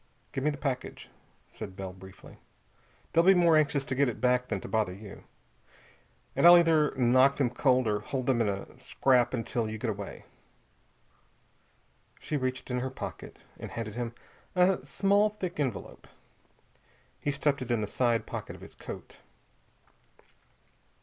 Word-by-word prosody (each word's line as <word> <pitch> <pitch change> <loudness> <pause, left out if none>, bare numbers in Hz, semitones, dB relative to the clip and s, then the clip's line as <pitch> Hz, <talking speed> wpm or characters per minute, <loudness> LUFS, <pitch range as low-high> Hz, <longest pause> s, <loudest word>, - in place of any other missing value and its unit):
"Give 135 - -3
me 150 - +3
the 145 - -4
package," 135 -3 -4 0.4
said 95 - -9
Bell 95 -1 -6
briefly. 95 0 -14 0.7
"They'll 165 - +5
be 190 +2 +6
more 170 -2 +5
anxious 145 -2 +2
to 130 - -3
get 135 0 +2
it 115 - -6
back 125 0 +2
than 100 - -2
to - - -7
bother 105 -5 0
you. 100 0 -11 1.1
And - - +6
I'll 175 0 +10
either 160 -3 +3
knock 130 +2 +4
them 130 -4 +1
cold 130 0 +2
or 105 -1 +1
hold 130 +4 -4
them 125 -3 +2
in 110 - +2
a 100 0 -6
scrap 125 -3 +2
until 115 -2 -2
you 110 - -5
get 110 +1 -2
away." 100 -1 -8 1.9
She 155 - -4
reached 130 -1 -2
in 125 - 0
her 130 +1 -2
pocket 130 - -8 0.2
and - - -7
handed 115 -2 -5
him 120 0 -4 0.4
a 180 +1 +3
small 200 +2 +2
thick 185 -6 -6
envelope. 130 -8 -4 1.1
He - - -2
stuffed 140 -1 0
it 125 - -5
in 120 -2 +1
the - - 0
side 120 +2 0
pocket - - -6
of - - -15
his - - -11
coat. - - -10
130 Hz, 165 wpm, -29 LUFS, 115-145 Hz, 1.9 s, I'll